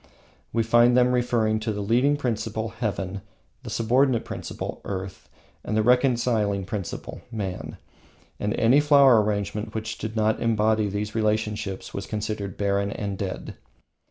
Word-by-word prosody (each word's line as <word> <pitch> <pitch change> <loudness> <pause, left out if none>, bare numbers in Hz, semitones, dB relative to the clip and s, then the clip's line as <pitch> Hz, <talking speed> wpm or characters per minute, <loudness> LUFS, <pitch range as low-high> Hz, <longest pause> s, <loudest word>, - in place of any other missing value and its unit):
We 115 0 +1
find 120 +2 +5
them 125 0 +4
referring 120 -3 +1
to 110 0 -2
the 105 -1 -3
Leading 125 +7 +3
Principle 115 -4 -2
(Heaven), 100 -4 -3 0.4
the 125 - -8
Subordinate 120 +2 +2
Principle - - -6
(Earth), 95 -1 -6 0.3
the 110 0 0
Reconciling 120 -5 +2
Principle 100 -1 -5
(Man), 100 -5 -5 0.6
and 105 +2 -1
any 120 +5 +5
flower 140 -6 +6
arrangement 105 +1 -2
which 110 0 -4
did 110 0 -5
not 110 0 +1
embody 110 -2 +2
these 105 +1 -3
principles 105 -2 -2
was 100 - -5
considered 105 -3 -4
barren 100 0 0
and 100 -1 -3
dead. 95 -1 -5
110 Hz, 135 wpm, -25 LUFS, 105-120 Hz, 0.6 s, flower